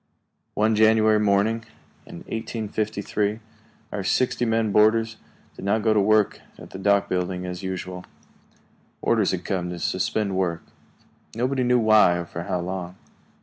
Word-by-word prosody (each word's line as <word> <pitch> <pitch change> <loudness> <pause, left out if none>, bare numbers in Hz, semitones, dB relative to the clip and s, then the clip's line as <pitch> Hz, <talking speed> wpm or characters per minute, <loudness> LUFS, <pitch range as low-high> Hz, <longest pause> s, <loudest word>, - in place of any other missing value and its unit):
One 110 +1 +2
January 110 0 +4
morning 105 +2 +1 0.4
in - - -10
1853, 110 -1 -3 0.5
our 100 - -3
sixty 120 +4 +1
men 115 -2 +1
boarders 110 +2 +3 0.4
did - - -10
not 105 +2 +1
go 110 -1 +3
to 105 - +3
work 105 0 +2 0.2
at - - -12
the 95 - -8
dock 100 0 +2
building 90 0 -2
as 90 0 -5
usual. 90 -1 -5 1.0
Orders 110 -4 +2
had 90 -1 -3
come 90 -3 -2
to 90 - -5
suspend 100 +3 -1
work. 85 -3 -1 0.7
Nobody 130 +3 0
knew 125 0 +3
why, 110 -6 +5
or 85 - -4
for 85 0 -7
how 90 -2 -2
long. 90 0 -5
105 Hz, 145 wpm, -24 LUFS, 95-110 Hz, 1.0 s, why